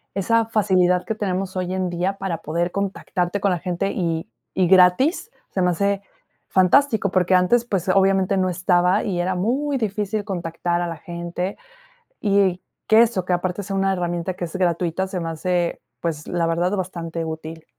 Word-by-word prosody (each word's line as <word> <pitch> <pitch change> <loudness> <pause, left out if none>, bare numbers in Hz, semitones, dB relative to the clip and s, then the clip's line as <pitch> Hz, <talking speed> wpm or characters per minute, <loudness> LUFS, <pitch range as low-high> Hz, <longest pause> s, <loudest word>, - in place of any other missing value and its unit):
Esa 225 +4 +2
facilidad 185 -5 +2
que 220 - -2
tenemos 190 -2 -2
hoy 185 0 -2
en 185 -1 -1
día 180 +3 -1
para 190 -4 -3
poder 170 +4 -2
contactarte 200 -1 -2
con 200 -1 +2
la 175 - 0
gente, 180 +3 -2
y 165 -3 -2 0.3
y 185 -2 +3
gratis, 190 - +4 0.2
se 185 - -1
me 180 - +3
hace 200 +2 0 0.4
fantástico, 210 +3 +3
porque 185 0 +2
antes, 205 +7 +4
pues, 190 -5 -2
obviamente 195 0 +3
no 185 -1 +1
estaba, 180 +2 +2
y 185 -5 -2
era 185 +2 0
muy 270 +9 0
difícil 210 -2 -2
contactar 175 -3 -2
a 175 - -1
la 165 -2 -5
gente. 175 +3 -5 0.6
Y 195 -3 +2 0.3
que 220 +1 +7
eso, 220 -6 0
que 180 0 -1
aparte 180 +2 -1
sea 195 0 -4
una 195 0 +2
herramienta 175 0 -2
que 175 - -4
es 165 - -10
gratuita, 175 0 0
se 190 -1 -4
me 165 -1 -3
hace, 175 +2 -1 0.2
pues, 155 -3 -3
la 170 -1 0
verdad 170 +2 +1
bastante 170 -3 -4
útil. 160 0 -7
185 Hz, 180 wpm, -22 LUFS, 175-195 Hz, 0.6 s, que